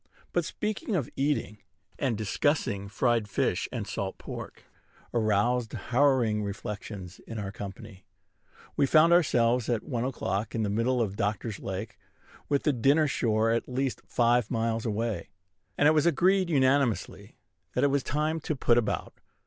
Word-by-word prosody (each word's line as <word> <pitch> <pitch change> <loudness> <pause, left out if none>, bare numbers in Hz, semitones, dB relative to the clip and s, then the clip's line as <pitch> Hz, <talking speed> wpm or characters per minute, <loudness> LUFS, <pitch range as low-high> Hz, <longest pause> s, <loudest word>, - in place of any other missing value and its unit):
But - - +1
speaking 210 0 -3
of 150 -9 -1
eating, 135 -7 -1 0.4
and 125 -6 0
discussing 105 -2 0
fried 115 0 +1
fish - - 0
and - - -3
salt - - -4
pork, - - -8 0.5
aroused 115 +1 +1
harrowing 125 -5 +2
reflections 100 -2 -6
in 115 - -6
our 100 -2 -4
company. 100 0 -9 0.7
We 140 - +3
found 160 +4 +6
ourselves 125 -8 +3
at 115 -3 0
one 120 -6 -2
o'clock 110 -5 -2
in 110 - 0
the 100 - -1
middle 120 +3 +1
of 100 -2 -4
Doctor's 105 +1 -2
Lake, 95 +3 -6 0.5
with 140 -1 +1
the 150 - +2
dinner 140 +6 +3
shore 110 -4 +1
at 115 +2 -1
least 130 +1 -2
five 120 -2 +2
miles 115 -1 -1
away; 110 -4 -2 0.5
and 145 - +5
it - - +7
was 155 +1 +3
agreed, 185 +3 +3
nem. 135 -5 +3
con., - - -11 0.5
that - - +2
it 140 - +4
was 140 0 +2
time 155 +5 -1
to 155 0 -3
put 120 -2 +3
about. 115 - -2
120 Hz, 155 wpm, -28 LUFS, 105-140 Hz, 0.7 s, it